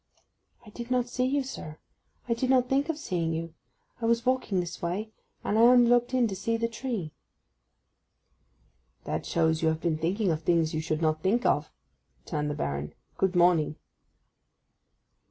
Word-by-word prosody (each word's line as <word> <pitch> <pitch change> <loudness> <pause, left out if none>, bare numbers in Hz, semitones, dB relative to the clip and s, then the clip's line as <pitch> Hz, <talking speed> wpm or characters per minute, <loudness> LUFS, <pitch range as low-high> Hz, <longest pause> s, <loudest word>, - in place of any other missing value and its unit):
'I 210 - -13
did 235 +2 -8
not 250 -1 +1
see 250 +1 -1
you, 275 +2 +1
sir. 155 -12 -8 0.5
I 235 - +2
did 255 +2 -1
not 255 -1 +4
think 275 +4 +1
of 320 - -1
seeing 170 - -2
you. 165 0 -4 0.5
I 225 - 0
was 235 +1 +2
walking 255 -7 +1
this 175 -1 -5
way, 195 +6 -3 0.3
and 215 - +1
I - - +6
only 245 0 +7
looked 240 0 +3
in 255 -2 +3
to 195 - -4
see 230 +5 -1
the 230 0 0
tree.' 230 - -4 1.9
'That 75 +1 -3
shows 160 -1 +1
you 160 - +2
have 160 0 +1
been 160 -2 0
thinking 185 +4 0
of 155 0 -2
things 165 -1 +2
you 155 - -1
should 155 0 -2
not 155 0 +1
think 215 +8 +1
of,' - - +1 0.5
returned 150 -2 -2
the 145 - -2
Baron. 70 +1 -3 0.2
'Good 190 -1 +1
morning. 170 -4 +3
190 Hz, 175 wpm, -28 LUFS, 160-240 Hz, 1.9 s, only